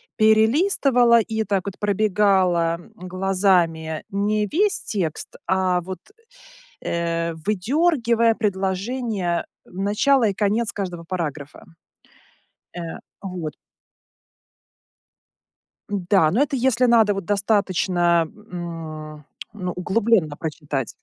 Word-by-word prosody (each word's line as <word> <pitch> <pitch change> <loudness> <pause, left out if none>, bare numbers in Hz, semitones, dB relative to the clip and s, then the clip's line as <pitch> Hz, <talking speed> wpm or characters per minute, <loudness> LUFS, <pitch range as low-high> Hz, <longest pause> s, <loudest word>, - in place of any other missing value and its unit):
перелистывала 235 - +4
и, 220 0 -1
так 195 -2 -1
вот, 200 - -6
пробегала, 190 -5 +2
м, - - -17
глазами 180 -4 0
не 210 +1 0
весь 395 - +1
текст, 180 - -3
а 185 -1 +1
вот, 185 +2 -7 0.8
э, 170 -1 -2
выдергивая 230 - +1
предложение, 195 -1 -1 0.2
начало 210 +6 +2
и 195 - -2
конец 215 +3 0
каждого 180 -4 -5
параграфа. 155 -5 -5 1.1
Э, - - -4 0.4
вот. 180 -5 -5 2.4
Да, 190 -4 +2
но 245 +9 +2
это 285 -2 -1
если 250 0 +2
надо, 225 -4 +4
вот, 195 -2 -4
достаточно, 185 -4 +2 0.3
м, 155 -4 -7 0.3
ну, 180 -3 -4
углублённо 185 -4 +1
прочитать. 150 -6 -3
195 Hz, 95 wpm, -22 LUFS, 170-220 Hz, 2.4 s, перелистывала